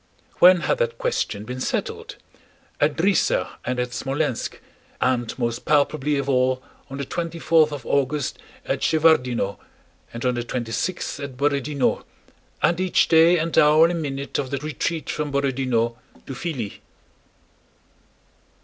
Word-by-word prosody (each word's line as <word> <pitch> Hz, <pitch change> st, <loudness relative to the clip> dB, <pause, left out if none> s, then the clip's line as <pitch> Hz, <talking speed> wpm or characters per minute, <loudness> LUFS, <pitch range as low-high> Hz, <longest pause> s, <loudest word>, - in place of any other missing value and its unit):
When 180 Hz, -1 st, +7 dB
had -, -, 0 dB
that 485 Hz, -1 st, -1 dB
question 485 Hz, -, -2 dB
been 125 Hz, +2 st, -6 dB
settled? -, -, -3 dB, 0.6 s
At 145 Hz, 0 st, +2 dB
Drissa 190 Hz, +2 st, +2 dB
and 125 Hz, +1 st, -2 dB
at 125 Hz, 0 st, -1 dB
Smolénsk 135 Hz, +1 st, -2 dB, 0.4 s
and 125 Hz, -2 st, 0 dB
most 120 Hz, -1 st, -2 dB
palpably 150 Hz, 0 st, +1 dB
of 140 Hz, -1 st, -2 dB
all 130 Hz, -1 st, +1 dB, 0.3 s
on 135 Hz, -, -6 dB
the 140 Hz, -, -3 dB
twenty 170 Hz, +3 st, -4 dB
fourth 160 Hz, -2 st, +3 dB
of 145 Hz, -4 st, -6 dB
August 140 Hz, 0 st, 0 dB, 0.3 s
at -, -, -1 dB
Shevárdino 125 Hz, -10 st, +2 dB, 0.5 s
and 115 Hz, +2 st, -6 dB
on 125 Hz, -, +2 dB
the 120 Hz, -1 st, -2 dB
twenty 120 Hz, -1 st, -4 dB
sixth 175 Hz, +2 st, -3 dB
at 140 Hz, -3 st, -7 dB
Borodinó, 140 Hz, -1 st, 0 dB, 0.6 s
and 170 Hz, 0 st, +3 dB
each 185 Hz, -1 st, +2 dB
day 165 Hz, +2 st, +6 dB
and 165 Hz, 0 st, -2 dB
hour 150 Hz, +2 st, +6 dB
and 170 Hz, -1 st, -2 dB
minute 140 Hz, -2 st, -3 dB
of 135 Hz, -2 st, -3 dB
the 140 Hz, -, -2 dB
retreat 155 Hz, +3 st, -3 dB
from 150 Hz, -1 st, -3 dB
Borodinó 130 Hz, -4 st, 0 dB, 0.3 s
to 135 Hz, -, -6 dB
Filí. 130 Hz, -, -5 dB
140 Hz, 145 wpm, -23 LUFS, 125-160 Hz, 0.6 s, When